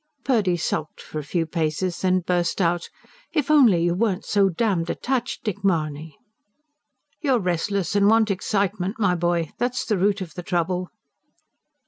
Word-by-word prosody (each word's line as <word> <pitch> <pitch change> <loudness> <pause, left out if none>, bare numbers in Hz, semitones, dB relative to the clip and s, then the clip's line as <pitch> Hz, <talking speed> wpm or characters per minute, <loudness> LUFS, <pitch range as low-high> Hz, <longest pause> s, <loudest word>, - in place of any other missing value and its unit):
Purdy 205 -9 +2
sulked 155 -2 -3
for 155 - -6
a - - -5
few 165 +3 -1
paces, 165 +2 -2
then 185 -1 +2
burst 175 0 0
out: 175 -1 0 0.4
"If 300 -3 +1
only 235 - +5
you 175 0 +2
weren't 200 0 0
so 200 -2 +3
damned 185 -3 0
detached, 255 +6 -2
Dick 205 -2 -4
Mahony!" 155 -5 -1 1.0
"You're 275 -6 +2
restless, 185 0 -1
and 200 0 +4
want 220 -1 +4
excitement, 195 0 -1
my 200 -5 +2
boy 170 -2 0
that's 245 +1 -1
the 210 -4 0
root 200 +2 +2
of 175 -5 -7
the 180 - -6
trouble." 180 +1 -1
185 Hz, 155 wpm, -23 LUFS, 170-210 Hz, 1.0 s, only